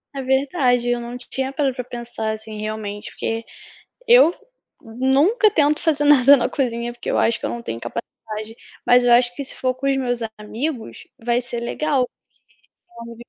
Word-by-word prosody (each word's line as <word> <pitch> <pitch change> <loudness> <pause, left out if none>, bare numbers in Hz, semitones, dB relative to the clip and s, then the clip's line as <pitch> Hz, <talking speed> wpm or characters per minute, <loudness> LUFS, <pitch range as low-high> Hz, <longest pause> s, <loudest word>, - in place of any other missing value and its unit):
É 275 - -3
verdade, 265 -2 +1
eu 245 0 +1
não 240 +1 -6
tinha 265 +1 -4
parado 275 -3 0
pra 250 - -4
pensar 235 -2 -5
assim 220 0 -7
realmente 215 -1 -5
porque, 225 0 -3 0.6
eu 485 -8 +7 0.5
nunca 270 - +2
tento 300 -5 +2
fazer 295 -3 +1
nada 285 -1 +7
na 245 - 0
cozinha 240 -3 -2
porque 240 - -6
eu - - +1
acho 230 0 +2
que - - -3
eu - - -3
não 235 - -5
tenho 115 - -5
capacidade, 215 - -7 0.3
mas 245 0 +6
eu 245 - +4
acho 240 0 +4
que 280 - -5
se - - -8
for 255 0 0
com 265 +2 -5
os 275 - +2
meus 245 -2 -1 0.2
amigos, 230 +4 -5 0.2
vai 240 0 +2
ser 240 -1 -5
legal, 265 +1 0 1.0
porque 235 0 -10
245 Hz, 180 wpm, -21 LUFS, 235-275 Hz, 1.0 s, eu